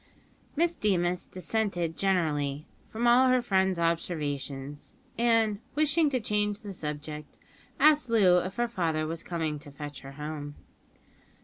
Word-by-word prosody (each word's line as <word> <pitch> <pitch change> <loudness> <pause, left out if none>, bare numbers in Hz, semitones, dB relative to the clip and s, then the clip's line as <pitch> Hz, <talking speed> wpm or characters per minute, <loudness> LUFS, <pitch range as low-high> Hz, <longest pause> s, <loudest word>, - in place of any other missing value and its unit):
Miss 340 +3 +2
Deemas 180 - 0
dissented 185 -4 -2
generally 155 -6 0 0.2
from 230 +2 -3
all 245 +2 +6
her 255 0 +4
friend's 190 -5 +1
observations, 145 -4 -3 0.2
and, 225 -3 +2 0.2
wishing 305 +1 +3
to 260 -2 0
change 210 -1 -1
the 205 -3 -7
subject, 150 -2 -6 0.4
asked 300 -2 +5
Loo 190 -6 +5
if 185 +2 -4
her 240 0 +1
father 165 -8 -1
was 165 +1 -4
coming 160 -4 -3
to 145 0 -10
fetch 145 0 -8
her 135 +1 -10
home. 150 0 -6
180 Hz, 135 wpm, -28 LUFS, 150-225 Hz, 0.4 s, all